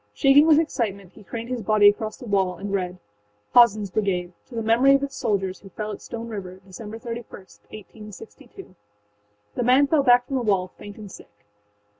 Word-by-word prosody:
Shaking 285 +2 +5
with 310 -2 +6
excitement, 205 - -2
he - - -15
craned 230 +4 -7
his 250 -2 -3
body 210 0 +4
across 215 +1 +1
the - - -11
wall 190 -4 0
and 200 +2 -6
read: 180 -2 -2 0.6
Hazenâs 215 -5 +5
Brigade 180 -4 -1
to 245 - -12
The 225 - -3
Memory 245 +5 +4
of 275 - 0
Its 275 -1 -5
Soldiers 195 -6 -2
who 195 - -14
fell 215 +3 -6
at - - -8
Stone 230 0 -7
River, 190 -4 -7
Dec. 190 - -17
31, 230 +3 -7
1862. 215 - -13 0.8
The - - -3
man 255 +4 +4
fell 295 +1 +2
back 245 -2 +4
from 270 +1 -3
the - - -1
wall, 195 -5 0
faint 205 -1 -11
and 210 -3 -10
sick. 105 - -16
215 Hz, 190 wpm, -23 LUFS, 195-245 Hz, 0.8 s, with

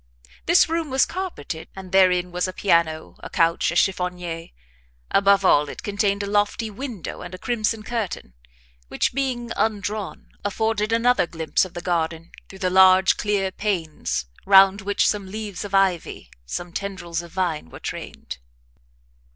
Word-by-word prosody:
This 345 +1 +6
room 330 -1 -2
was 265 0 +3
carpeted, 360 - -5
and 190 -1 -9
therein 180 -2 +4
was 180 +1 -1
a 185 - -5
piano, 170 -5 +1
a - - -9
couch, 165 0 +2
a - - -4
chiffonniere 180 -3 -1 0.6
above 195 0 +4
all, 145 -4 +4
it - - -8
contained 200 0 0
a - - -2
lofty 205 +2 0
window 225 - -6
with 180 0 -8
a - - -9
crimson 220 +1 -1
curtain, 205 - -4 0.5
which, - - -1
being 250 -3 -2
undrawn, 205 -4 -2
afforded 215 +1 -1
another 235 -3 +3
glimpse 165 +1 0
of 185 - -12
the 175 - -4
garden, 165 -1 -2 0.2
through 190 - -11
the 185 -1 -1
large, 190 0 +6
clear 200 -2 0
panes, 175 - -2 0.2
round 195 0 +6
which 200 +1 +1
some 205 -2 -1
leaves 205 -2 -5
of 200 -1 -3
ivy, 180 - 0 0.2
some 170 - -5
tendrils 175 -4 -4
of 170 -1 -12
vine 170 - -2
were - - -11
trained. - - -7
195 Hz, 155 wpm, -23 LUFS, 175-210 Hz, 0.6 s, This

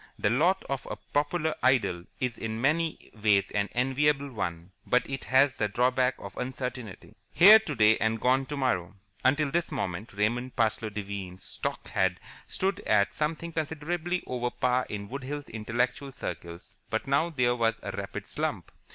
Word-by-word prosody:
The - - +1
lot 170 +10 +2
of 140 -1 -3
a - - -3
popular 155 +2 -1
idol 120 -9 +2
is 125 -2 -1
in 110 0 -3
many 155 +5 0
ways 105 -2 +3
an 105 0 0
enviable 140 +2 +1
one, 85 -5 -4 0.2
but 125 - +2
it 135 -1 -5
has 135 +1 +4
the 105 - +1
drawback 125 +4 +2
of 100 - -9
uncertainty. 125 -5 -5 0.2
Here 210 +5 +9
today 110 - +3
and 110 +1 +1
gone 130 +3 +2
tomorrow. 125 -12 -1 0.3
Until 140 +2 +3
this 170 +1 0
moment 100 - -3
Raymond 120 +5 -1
Parsloe 110 -2 +1
Devine's 100 -3 -6
stock - - -4
had 95 -1 +1 0.3
stood 195 +1 -1
at 105 -1 +3
something 160 +2 -2
considerably 160 +3 -2
over 125 -1 -2
par 125 +1 0
in 100 -1 -5
Wood 140 +5 -6
Hills 145 +2 -5
intellectual 125 +5 -2
circles, 85 -4 -7
but 110 - -1
now 140 +5 +2
there 125 -6 +1
was 115 -1 +2
a - - -3
rapid - - -5
slump. - - -3
125 Hz, 160 wpm, -28 LUFS, 110-145 Hz, 0.3 s, Here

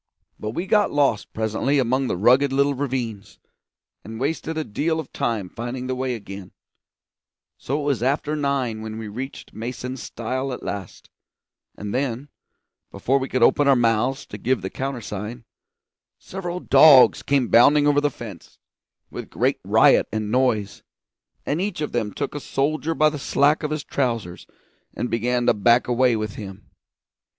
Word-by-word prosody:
But 105 +1 -4
we 175 - -2
got 205 +1 +2
lost 140 -7 +1
presently 110 +6 0
among 130 +1 +1
the - - -2
rugged 130 +7 +4
little 140 +1 +2
ravines, 125 -7 -4 0.7
and 110 +2 -8
wasted 160 +3 -2
a 155 - -1
deal 160 +7 -1
of 155 - -8
time 110 -5 -2
finding 120 +5 -6
the 130 - -2
way 130 -1 -2
again, 100 -3 -9 1.1
so 140 +3 -2
it - - -4
was 140 -5 0
after 145 +4 0
nine 135 -6 -1
when 110 0 -6
we 110 -1 -6
reached 125 +6 -7
Mason's 125 +3 -6
stile 130 +3 -4
at - - -8
last; 100 -2 -7 0.7
and 100 0 -5
then 135 +1 -2 0.6
before 135 +2 0
we 130 - -4
could 130 -2 +1
open 145 +4 +4
our 135 - +6
mouths 120 +3 +1
to - - -9
give 125 -5 0
the 95 - -4
countersign, 120 -3 -5 0.7
several 180 -2 -6
dogs 145 -7 +7
came 140 -4 +1
bounding 145 +5 +6
over 145 0 +3
the 145 - +2
fence, 110 - -11 0.5
with - - -7
great - - 0
riot - - +4
and 110 -1 -3
noise, 115 -5 0 0.6
and 150 +5 -1
each 195 -3 -3
of 150 - -3
them 110 -4 -1
took - - -4
a 145 - -4
soldier 155 +4 -1
by 155 - +4
the 150 -1 -6
slack 145 +2 +2
of 150 - -2
his 155 -1 -3
trousers 115 -10 -3 0.5
and 120 - -3
began 120 +2 0
to - - +4
back 120 +4 +3
away 125 0 +3
with 110 -2 -3
him. 95 -3 -10
130 Hz, 165 wpm, -23 LUFS, 110-145 Hz, 1.1 s, dogs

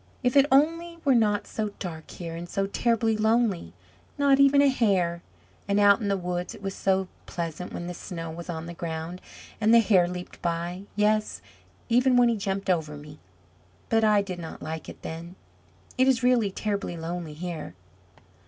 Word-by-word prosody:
If 250 +1 +1
it 280 0 +6
only 330 +5 +2
were 275 - +5
not 210 -4 +2
so 215 -2 -4
dark 160 -4 -7
here, 165 -2 -7
and 170 +1 -7
so 195 +2 0
terribly 225 +2 +1
lonely! 215 - +1 0.5
Not 280 -1 +4
even 275 0 +6
a - - +5
hare. 190 -10 +1 0.5
And 200 0 +2
out 205 +1 +6
in 205 - -1
the 200 -1 +1
woods 180 0 -3
it - - -14
was 195 0 -3
so 190 -1 +1 0.2
pleasant, 170 +1 -5
when 175 - -5
the 180 - -5
snow 165 -2 -6
was 170 +2 -8
on 160 -1 -4
the 170 - -7
ground, 165 +1 -5 0.4
and 215 +1 +4
the 235 - +8
hare 195 -6 +4
leaped 180 0 -7
by; 175 +2 -3
yes 215 +1 +1 0.5
even 250 +2 +4
when 245 -1 +5
he 230 - +1
jumped 195 -1 -3
over 160 -5 0
me; 150 +1 -12 0.7
but 225 0 +3
I 210 -2 +4
did 185 -3 -6
not 165 -1 -8
like 160 +1 -5
it - - -12
then. 170 +2 -7 0.6
It 260 - +5
is 260 -1 +3
really 245 -4 +3
terribly 200 -3 -3
lonely 165 -1 -5
here!" 160 - -6
195 Hz, 185 wpm, -26 LUFS, 170-225 Hz, 0.7 s, the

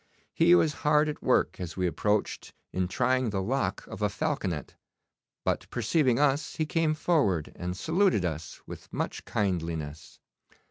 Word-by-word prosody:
He 170 +1 +6
was 160 -3 +3
hard 150 +1 +4
at 150 - -5
work - - +2
as 90 -1 -6
we 90 - +1
approached 105 +4 -1 0.2
in 90 -1 0
trying 130 +4 +1
the 100 -2 -1
lock 100 -1 -1
of - - -9
a 105 - +2
falconet; 100 - -2 0.7
but - - -1
perceiving 125 +1 +2
us, 145 +1 +1
he 155 - 0
came 155 0 +1
forward 140 - +1
and 90 +1 -4
saluted 165 - +2
us 80 -1 -5
with - - -10
much - - -3
kindliness. 80 -6 -3
110 Hz, 150 wpm, -28 LUFS, 90-150 Hz, 0.7 s, He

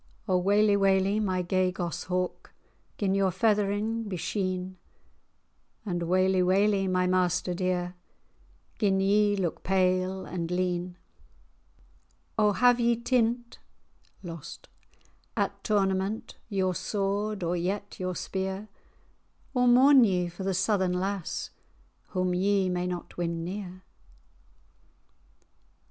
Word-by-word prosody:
"O 185 - +2
waly, 205 +3 +3
waly, 195 +1 +2
my 185 -3 0
gay 185 +1 +1
goss 175 -3 -4
hawk, 180 -1 -3 0.5
Gin 195 -2 0
your 195 -1 +2
feathering 210 +3 0
be 185 - -3
sheen!" 185 0 -3 1.1
"And 175 -4 -2
waly, 185 +1 +3
waly, 195 +2 +2
my 185 0 +2
master 180 0 +1
dear, 180 0 -1 0.9
Gin 195 -3 +2
ye 205 +1 +3
look 180 -5 -2
pale 185 0 +1
and 170 -2 -4
lean! 180 0 -2 1.4
O 210 -1 +3
have 245 +2 +4
ye 235 0 +3
tint[#] 235 0 0 1.8
at - - -1
tournament 195 0 0
Your 190 -3 0
sword, 200 +2 -2
or 170 +1 0
yet 195 +4 -3
your 185 -1 -2
spear? 190 +3 -4 0.8
Or 250 -2 +3
mourn 260 +2 +7
ye 180 -5 +1
for 170 - -10
the 190 0 -1
Southern 190 -1 +1
lass, 190 0 -3 0.6
Whom 185 -1 -1
ye 195 +1 +2
may 180 0 -1
not 180 -1 -6
win 170 -1 -2
near?" 185 0 -6
190 Hz, 115 wpm, -28 LUFS, 180-205 Hz, 1.8 s, mourn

